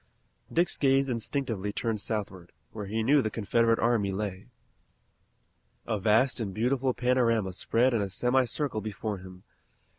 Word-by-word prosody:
Dick's 175 +2 +1
gaze 135 -1 +3
instinctively 115 -4 -2
turned 110 0 -2
southward, 100 -6 -4 0.2
where 105 -2 -6
he 110 +2 -1
knew 140 +5 +4
the 110 - -1
Confederate 115 +2 +1
army 115 -4 +1
lay. 95 -1 -4 1.4
A 110 -3 -1
vast 115 +6 +3
and 100 -5 -4
beautiful 125 +3 +1
panorama 115 -6 +1
spread 120 +7 +1
in 115 - +1
a 100 - -2
semi 125 +7 +2
circle 135 -3 -2
before 105 -1 -4
him. 90 0 -12
115 Hz, 145 wpm, -28 LUFS, 100-125 Hz, 1.4 s, knew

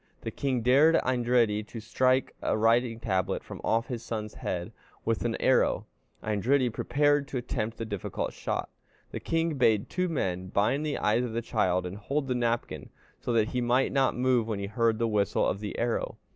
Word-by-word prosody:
The 115 - -4
king 130 -2 -1
dared 140 +7 +5
Eindridi 120 -4 +2
to 115 - -7
strike 130 +4 +1
a - - 0
writing 115 +1 +2
tablet 95 -5 -1
from - - -9
off 115 +1 +1
his 120 -3 -5
son's 110 -2 -5
head 90 -1 -4 0.3
with - - 0
an - - -1
arrow. - - +2 0.4
Eindridi 120 +5 +1
prepared 145 +2 +1
to 140 - -4
attempt 115 -2 -3
the 115 - -4
difficult 100 -4 -4
shot. - - -3 0.4
The - - -4
king 165 -3 -1
bade 110 -5 +2
two 180 0 0
men 95 - -2
bind 105 +10 +1
the 150 -1 -1
eyes 110 +4 +2
of 120 -3 -4
the 115 - -1
child 90 -6 +1
and 90 +2 -6
hold 140 +6 -2
the 130 - 0
napkin, 115 - -2 0.3
so - - -3
that 110 -1 +2
he 125 - -1
might 125 +2 +2
not 135 -1 +2
move 125 -3 +2
when 110 -3 -2
he 100 - -3
heard 115 +2 +1
the 115 +1 +1
whistle 105 -2 +1
of 100 - -1
the 105 -1 -5
arrow. 120 0 -1
115 Hz, 195 wpm, -28 LUFS, 105-130 Hz, 0.4 s, dared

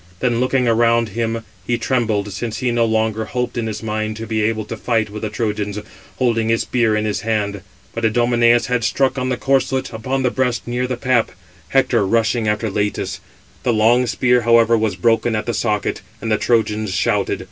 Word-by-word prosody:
Then 120 -2 +1
looking 130 0 +1
around 115 0 +3
him, 115 +1 -2 0.2
he 120 - +1
trembled, 110 -5 -1
since 115 +2 -4
he 125 -2 0
no 120 -1 +2
longer 110 0 0
hoped 125 +2 -3
in 115 -2 -2
his 110 0 -5
mind 110 0 -2
[to 115 - -5
be 110 -1 -1
able] 110 0 0
to - - -6
fight 110 -3 -1
with 105 - -7
the 110 - -2
Trojans, 105 -2 -2 0.4
holding 115 -3 +1
his 115 0 +2
spear 120 -3 +1
in 105 0 0
his 105 -1 -1
hand. 105 -3 -1 0.3
But 115 - -5
Idomeneus 120 +1 +3
had 125 -1 -1
struck, 135 +2 +1
on 130 0 -1
the 125 - -1
corslet, 135 -1 0
upon 130 +4 -2
the 125 - +2
breast 125 -3 -1
near 125 +1 -1
the 125 -1 -3
pap, 125 -2 +1 0.3
Hector 120 +2 +2
rushing 115 +2 +1
after 105 +1 0
Leïtus: 105 0 -2 0.4
the 120 - +1
long 120 +3 +3
spear, 125 +2 +2
however, 115 0 +4
was 110 -4 0
broken 115 +4 +1
at 110 - -2
the 120 - -2
socket; 105 -1 -1 0.2
and 115 - -3
the 110 - +2
Trojans 110 -3 +1
shouted. 100 -1 0
115 Hz, 200 wpm, -19 LUFS, 110-120 Hz, 0.4 s, however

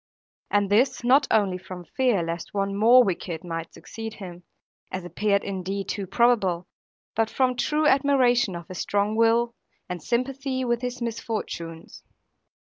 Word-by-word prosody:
And 205 -1 +1
this, 245 +5 +3
not 270 +4 +4
only 195 -4 +2
from 180 -1 -9
fear 245 -4 +1
lest 165 +3 -5
one 195 0 -1
more 235 +5 +7
wicked 175 -5 -3
might 165 -1 -5
succeed 225 -1 -8
him 180 -3 -9 0.5
(as 185 -1 -4
appeared 200 +2 0
indeed 195 0 -4
too 200 -2 -3
probable), 195 -5 +2 0.5
but 225 0 +1
from 255 0 +1
true 300 +5 0
admiration 260 -8 +3
of 170 -1 -8
his 185 - -7
strong 205 +1 0
will, 230 +1 +3 0.3
and 180 -2 -5
sympathy 260 - -1
with 240 -1 0
his 250 -1 -4
misfortunes. 210 -8 -5
215 Hz, 145 wpm, -25 LUFS, 185-245 Hz, 0.5 s, more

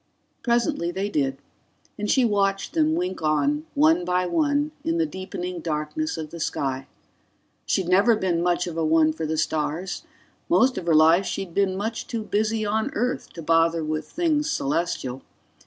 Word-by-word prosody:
Presently 235 - +1
they 195 +3 -2
did, 135 -7 0 0.6
and 210 0 -3
she 260 -2 +4
watched 195 -2 0
them 315 -1 +2
wink 360 - -2
on, 285 - +1
one 320 +4 +4
by 180 - +1
one, 290 - +1
in 330 +1 0
the 330 - +2
deepening 185 - -5
darkness 160 - -3
of 155 -2 -6
the 170 - -8
sky. 135 -3 -2 0.8
She'd 185 - +1
never 200 +6 +5
been 180 -5 0
much 175 0 +1
of 170 -2 -6
a 165 - 0
one 155 0 +4
for 160 0 -4
the 160 +1 -1
stars; 155 +4 -2 0.5
most 265 -6 +4
of 175 - -9
her 165 - +4
life 165 +5 +5
she'd 190 -3 -4
been 190 -1 +1
much 220 +3 -3
too 230 -2 -3
busy 215 +1 0
on 220 +1 0
Earth 250 +4 -2
to 165 - -8
bother 165 +1 +3
with 155 0 -3
things 315 -3 0
celestial. 135 - -1
190 Hz, 170 wpm, -24 LUFS, 160-250 Hz, 0.8 s, never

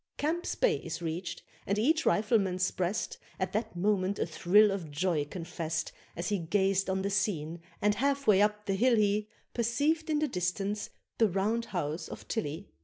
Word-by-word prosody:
Camp's 325 +4 -1
Bay 480 -3 +3
is 160 -2 -5
reached, 175 +1 -4 0.2
and 200 - +1
each 310 +9 +2
Rifleman's 195 -4 +2
breast 185 +3 -2 0.2
At 185 0 -1
that 215 -1 -2
moment 195 +1 +1
a - - 0
thrill 205 +4 +4
of 185 -5 -4
joy 150 0 0
confest, 165 -1 -4 0.2
As 170 +1 -3
he 205 -2 +1
gazed 190 +3 +1
on 190 0 0
the 200 - -1
scene, 170 -5 -1 0.2
and 210 0 +4
half 275 +5 0
way 205 -4 +6
up 210 0 +1
the 195 - 0
hill 240 +5 +4
he 210 0 +2 0.2
Perceived 290 +8 +1
in 305 - +2
the 305 0 +1
distance 195 0 -2 0.3
the 225 -2 +5
round 210 +5 0
house 160 -3 -3
of - - -9
Tilley. 180 -4 -3
200 Hz, 180 wpm, -30 LUFS, 175-220 Hz, 0.3 s, way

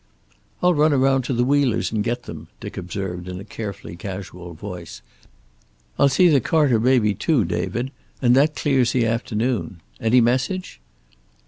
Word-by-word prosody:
"I'll 180 0 +5
run 150 -1 +3
around 135 0 +3
to 130 - -1
the 120 - +2
Wheelers' 135 -3 +1
and 110 -2 0
get 120 +2 -2
them," - - -9
Dick - - -8
observed, 90 -1 -5
in 90 0 -6
a - - -8
carefully 100 -4 -7
casual 90 -2 -8
voice. 90 -1 -8 1.0
"I'll 140 - +5
see 180 +7 +4
the 145 -6 +4
Carter 145 -5 +2
baby, 120 -3 +3
too, 125 - +1
David, 120 +9 -2 0.3
and 120 -2 +4
that 150 +3 +3
clears 130 -5 +1
the 125 -3 +2
afternoon. 115 -3 -1 0.2
Any 115 +3 +4
message?" 125 - 0
120 Hz, 155 wpm, -22 LUFS, 100-135 Hz, 1.0 s, I'll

